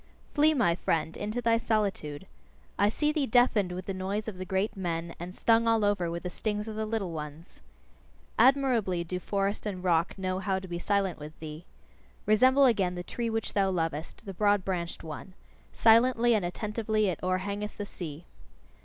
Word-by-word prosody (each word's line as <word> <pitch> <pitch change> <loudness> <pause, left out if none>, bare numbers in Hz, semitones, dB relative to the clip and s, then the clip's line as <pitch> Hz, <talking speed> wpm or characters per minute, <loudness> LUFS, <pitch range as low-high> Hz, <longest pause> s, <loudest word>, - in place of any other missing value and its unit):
Flee, 305 +1 +4
my 225 -11 +3
friend, 165 -2 -1
into 215 +4 -3
thy 230 0 +3
solitude! 195 -9 -1 0.5
I 205 +1 +5
see 300 +7 0
thee 300 -3 0
deafened 220 -5 +3
with 180 0 -5
the 195 - -3
noise 195 +3 -3
of 195 -4 -6
the 185 - -4
great 195 +3 -1
men, 170 -3 -3
and 180 +2 -7
stung 230 0 +3
all 225 -2 +3
over 200 -4 +1
with 170 +1 -4
the 180 - -4
stings 210 +1 -3
of 220 - -5
the 220 0 -2
little 215 -5 -2
ones. 155 +2 -8 0.8
Admirably 240 -8 +3
do 180 +2 -4
forest 200 +2 -1
and 185 -3 -4
rock 170 0 +1
know 185 -1 -2
how 190 -1 0
to 190 0 -6
be 175 -1 -4
silent 200 -2 0
with 150 +2 -10
thee. 155 +2 -8 0.6
Resemble 260 +6 +5
again 195 -7 +2
the 175 - -5
tree 235 +5 -3
which 225 -1 -2
thou 195 -1 +2
lovest, 165 +1 -3
the 195 - -6
broad 205 0 +2
branched 175 -3 -3
one 160 +4 -8 0.4
silently 235 +1 +5
and 210 -4 +2
attentively 215 +3 -1
it 180 - -2
o'erhangeth 200 +3 -2
the 205 - -4
sea. 165 -4 -8
195 Hz, 185 wpm, -29 LUFS, 175-220 Hz, 0.8 s, I